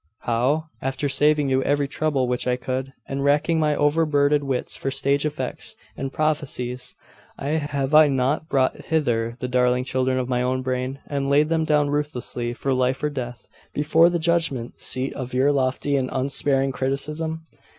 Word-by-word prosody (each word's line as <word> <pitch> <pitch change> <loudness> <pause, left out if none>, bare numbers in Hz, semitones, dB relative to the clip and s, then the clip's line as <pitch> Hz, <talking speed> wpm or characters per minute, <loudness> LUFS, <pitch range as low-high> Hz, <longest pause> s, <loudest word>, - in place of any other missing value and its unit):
'How? 125 +7 +1 0.2
After 135 +2 -2
saving 150 0 +3
you 130 0 +2
every 145 +1 +1
trouble 140 -3 0
which 125 0 -1
I 125 - +2
could, 130 +1 -4 0.2
and 135 0 -3
racking 150 +3 +2
my 150 -1 +2
overburdened 145 -1 +2
wits 135 -2 -2
for 135 - -3
stage 140 +2 +1
effects 140 -4 -4 0.2
and 135 0 -4
properties, 130 -5 -2 0.4
have 145 -1 -2
I 155 0 +8
not 140 +3 0
brought 130 -2 0
hither 120 -8 0
the 125 - -1
darling 125 0 +2
children 130 0 0
of 125 -1 -1
my 125 -1 0
own 130 +1 0
brain, 130 +1 -2
and 140 -1 -2
laid 150 +2 +4
them 160 -1 +1
down 150 -2 +2
ruthlessly, 125 -5 -2
for 135 +1 -1
life 130 +1 0
or 150 - +1
death, 125 -3 -6 0.3
before 160 +3 +4
the 175 - 0
judgment 160 -8 0
seat 130 +1 -1
of 130 -1 -6
your 135 +3 +4
lofty 140 +1 0
and 130 -1 -1
unsparing 135 0 +1
criticism? 150 +5 -2
135 Hz, 170 wpm, -23 LUFS, 130-150 Hz, 0.4 s, I